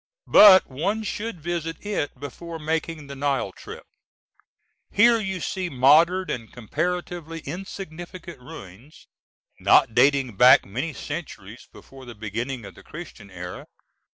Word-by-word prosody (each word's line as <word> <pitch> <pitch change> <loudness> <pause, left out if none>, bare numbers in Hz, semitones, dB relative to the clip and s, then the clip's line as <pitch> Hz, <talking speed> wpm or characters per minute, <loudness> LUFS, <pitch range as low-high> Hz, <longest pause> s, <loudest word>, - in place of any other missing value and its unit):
But 195 -3 +9
one 195 +12 -2
should 215 -2 -5
visit 165 +1 -4
it 170 -10 -3
before 165 +4 -8
making 160 0 -3
the 140 0 -9
Nile 135 -7 -1
trip. - - -11 1.1
Here 230 +3 +4
you 190 -3 -3
see 185 +1 -3
modern 165 +8 +4
and 115 -3 -6
comparatively 165 - -4
insignificant 175 -1 -8
ruins, 120 - -13 0.5
not - - +4
dating 130 -3 +3
back 125 +4 +7
many 130 +11 -4
centuries 125 - -8
before 135 -1 -14
the 120 -1 -10
beginning 115 +3 -5
of - - -10
the - - -15
Christian 150 -11 -11
era. 90 -1 -8
150 Hz, 125 wpm, -24 LUFS, 125-175 Hz, 1.1 s, But